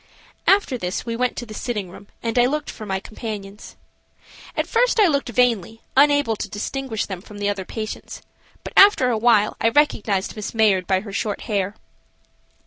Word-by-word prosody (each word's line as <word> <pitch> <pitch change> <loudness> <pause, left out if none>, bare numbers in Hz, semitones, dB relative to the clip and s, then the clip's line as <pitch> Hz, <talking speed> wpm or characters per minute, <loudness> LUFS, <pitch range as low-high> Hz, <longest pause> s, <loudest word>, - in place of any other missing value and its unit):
After 390 -11 +3
this 180 +4 -3
we 230 -1 -3
went 250 +1 -1
to 240 - -4
the 215 - -10
sitting 210 -5 -4
room 200 - -13 0.2
and 230 +1 0
I 245 - +5
looked 300 +3 -2
for 215 - -9
my 190 -1 -1
companions. 210 -1 -8 0.8
At - - +1
first 485 0 +2
I 420 - +7
looked 280 -7 +1
vainly, 225 -3 +1
unable 285 -4 +4
to 205 - -5
distinguish 225 +3 -3
them 190 -3 -6
from 210 +1 -12
the 205 0 -1
other 195 -2 -3
patients, 215 +1 -6 0.4
but - - -8
after 390 -11 +6
awhile 220 -2 +3
I 225 - +4
recognized 220 -8 +1
Miss 215 +1 -6
Mayard 205 -5 +3
by 190 -1 +2
her 200 -1 -9
short 205 0 -2
hair. 200 -1 -2
220 Hz, 180 wpm, -22 LUFS, 205-250 Hz, 0.8 s, I